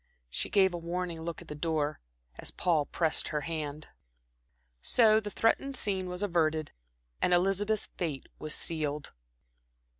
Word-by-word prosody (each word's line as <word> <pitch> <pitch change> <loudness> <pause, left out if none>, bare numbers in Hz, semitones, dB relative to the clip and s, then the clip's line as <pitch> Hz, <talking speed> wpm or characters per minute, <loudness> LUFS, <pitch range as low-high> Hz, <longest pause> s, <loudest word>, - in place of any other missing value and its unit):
She - - -2
gave 190 -3 +4
a 175 - -3
warning 170 0 -3
look 170 +1 -5
at - - -20
the - - -5
door, 150 -1 -1 0.4
as - - -2
Paul 160 -5 +1
pressed 160 -2 +2
her 150 - -1
hand. 155 -1 -4 0.9
So 220 - +5
the 210 -1 -5
threatened 255 +6 +1
scene 190 -4 0
was 180 +2 -4
averted 160 -5 +1 0.5
and 180 - +5
Elizabeth's 195 +4 +2
fate 155 -7 -4
was 155 0 -2
sealed. 150 -3 -2
170 Hz, 145 wpm, -30 LUFS, 155-190 Hz, 0.9 s, So